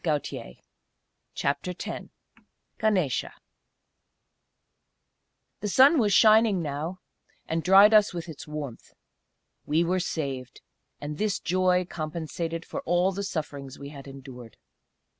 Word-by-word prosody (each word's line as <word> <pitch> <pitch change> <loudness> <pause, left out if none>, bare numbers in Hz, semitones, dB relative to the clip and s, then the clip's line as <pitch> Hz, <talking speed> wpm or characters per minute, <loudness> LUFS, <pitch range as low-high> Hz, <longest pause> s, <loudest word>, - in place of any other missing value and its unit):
CHAPTER 160 +6 -2
X - - -5 0.7
GANESA 190 - 0 2.3
The 210 - -3
sun 270 - +6
was 210 -4 +2
shining 215 -4 +5
now, 155 +5 -4 0.5
and 165 +1 -1
dried 195 +5 +7
us 210 -1 +6
with 175 -2 -6
its 155 -3 -9
warmth. 150 -6 -7 0.7
We 160 +3 +2
were 180 +2 0
saved. 135 -7 -4 0.4
And 150 +1 -6
this 210 -2 0
joy 180 0 +2
compensated 165 +1 -4
for - - -5
all 175 +3 +2
the 195 +1 -4
sufferings 145 -7 -5
we 140 0 -8
had 140 -2 -11
endured. 130 -4 -11
165 Hz, 110 wpm, -27 LUFS, 145-190 Hz, 2.3 s, dried